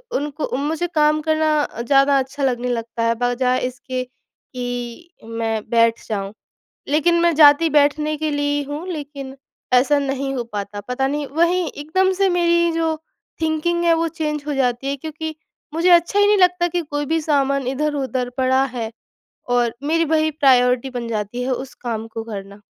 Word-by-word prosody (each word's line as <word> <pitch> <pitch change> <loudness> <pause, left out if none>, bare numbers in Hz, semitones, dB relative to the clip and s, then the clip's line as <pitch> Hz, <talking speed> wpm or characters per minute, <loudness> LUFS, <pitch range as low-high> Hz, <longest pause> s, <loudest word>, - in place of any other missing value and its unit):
उनको 290 -2 -2
मुझे 310 +5 -1
काम 305 0 +3
करना 315 0 +1
अ, 235 - -5
ज़्यादा 275 +2 +4
अच्छा 270 +2 -4
लगने 250 -2 0
लगता 230 -1 -3
है, 230 0 +2
बजाय 245 +1 +1
इसके 255 0 -5
कि 245 +3 -8 0.2
मैं 225 -1 -3
बैठ 230 0 +3
जाऊँ। 200 -2 -3 0.6
लेकिन 310 +4 +3
मैं 340 -1 +3
जाती 300 +1 +6
बैठने 300 +1 +2
के 310 +1 -2
लिए 290 0 0
ही 290 - -1
हूँ, 295 +4 -5
लेकिन 285 -5 -6 0.4
ऐसा 275 +4 +4
नहीं 270 -1 -2
हो 245 -2 -2
पाता। 205 0 -4
पता 265 +2 0
नहीं, 290 +1 -2
वहीं 340 +5 +1
एकदम 375 +6 0
से 390 +1 +2
मेरी 340 -1 +2
जो 325 -1 0 0.5
थिंकिंग 320 +2 0
है, 335 -1 +5
वो 330 0 0
चेंज 305 -3 -3
हो 295 - -2
जाती 250 -1 0
है 280 +1 -1
क्योंकि 315 +2 -6 0.4
मुझे 335 +3 +2
अच्छा 345 +3 +4
ही 410 - +5
नहीं 415 0 +4
लगता 360 -1 +3
कि 350 0 -1
कोई 290 -2 -4
भी 325 +2 +1
सामान 275 -3 +1
इधर-उधर 265 -3 -2
पड़ा 260 +1 +3
है, 245 -4 -4 0.6
और 245 -2 +1
मेरी 325 +3 +1
वही 315 0 +2
प्रायोरिटी 255 -3 +3
बन 245 -2 -5
जाती 220 +2 -3
है 255 - -2
उस 260 +1 -5
काम 225 -2 -4
को 225 0 -6
करना। 200 -2 -8
280 Hz, 175 wpm, -20 LUFS, 245-315 Hz, 0.6 s, जाती